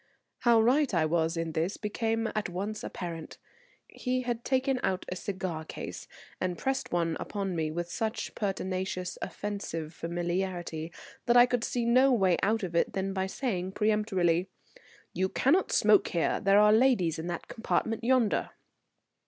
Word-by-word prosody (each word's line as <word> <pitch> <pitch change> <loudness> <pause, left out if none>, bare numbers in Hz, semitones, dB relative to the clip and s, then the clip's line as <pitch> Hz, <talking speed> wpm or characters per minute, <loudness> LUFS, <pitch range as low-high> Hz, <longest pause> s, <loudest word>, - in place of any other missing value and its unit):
How 235 -2 +5
right 260 +5 +3
I 160 -2 +3
was 165 +1 +1
in 165 -1 -2
this 165 +5 -1
became 225 +1 -1
at 215 -3 -2
once 200 +4 -4
apparent. 165 -3 -6 0.5
He 255 0 -2
had 240 -1 -3
taken 260 0 +1
out 185 -1 -1
a - - -2
cigar 185 -4 -4
case - - -7 0.3
and 180 -2 -2
pressed 270 0 -2
one 170 -2 0
upon 195 -3 -3
me 160 -2 -1
with 170 +2 -4
such 220 0 -3
pertinacious, 185 -3 -3
offensive 175 -6 -4
familiarity 175 -1 -3 0.4
that 240 0 +5
I 245 - +9
could 245 -2 -1
see 240 -1 -1
no 255 +3 +5
way 190 -7 +3
out 220 +1 +1
of 175 -2 -4
it 170 - +2
than 195 0 -2
by 190 0 -1
saying 190 -5 -3
peremptorily: 195 -5 +1 0.7
"You 190 0 0
cannot 320 - +2
smoke 210 -1 +5
here. 170 - 0
There 195 +1 +5
are 210 0 +6
ladies 220 -10 +3
in 165 - -4
that 175 -1 -4
compartment 225 0 -1
yonder." 245 -3 +2
195 Hz, 160 wpm, -29 LUFS, 175-225 Hz, 0.7 s, I